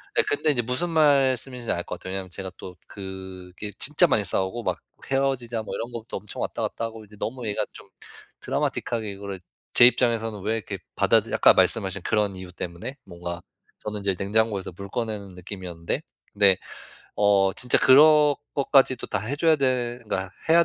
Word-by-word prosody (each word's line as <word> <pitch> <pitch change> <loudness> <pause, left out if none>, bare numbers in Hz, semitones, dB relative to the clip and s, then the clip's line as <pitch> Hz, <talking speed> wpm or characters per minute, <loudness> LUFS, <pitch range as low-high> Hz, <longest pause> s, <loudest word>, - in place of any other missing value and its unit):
네 455 - +5
근데 425 - 0
이제 120 -4 0
무슨 125 +9 -1
말씀인지 135 -6 +2
알 85 - -1
것 - - -7
같아요. 95 - -7
왜냐하면 95 -1 -4
제가 95 +1 -6
또 90 - -9
그게 95 0 -8
진짜 150 +1 +4
많이 105 - +2
싸우고 95 +5 -1
막 - - -1 0.3
헤어지자 130 -4 0
뭐 - - -5
이런 115 +2 -5
것도 115 -1 -6
엄청 - - -8
왔다 - - -3
갔다 115 - -2
하고 110 -1 -8
이제 105 +1 -16
너무 120 -1 -4
얘가 105 - -1
좀 - - -14 0.5
드라마틱하게 110 -3 -2
이거를 100 -1 -7 0.3
제 120 - +8
입장에서는 115 -4 +2
왜 110 +4 -1
이렇게 110 -4 -5 0.2
받아 - - +4
들 - - -8
아까 - - +6
말씀하신 - - +1
그런 105 -3 0
이유 95 -1 -9
때문에 90 +10 -7
뭔가 85 -1 -7 0.4
저는 105 -1 -4
이제 100 -1 0
냉장고에서 100 -1 0
물 100 +1 -8
꺼내는 105 -5 -4
느낌이었는데 90 -3 -5 0.3
네 100 -2 +5 0.6
어 100 -1 +4
진짜 125 -2 +2
그런 150 +2 +7 0.2
것까지도 135 -3 +3
다 105 - -1
해 125 +7 -3
줘야 160 0 +4
되 125 -3 0
그러니까 95 -3 -3 0.2
해야 170 +1 +6
110 Hz, 390 characters per minute, -25 LUFS, 95-125 Hz, 0.6 s, 제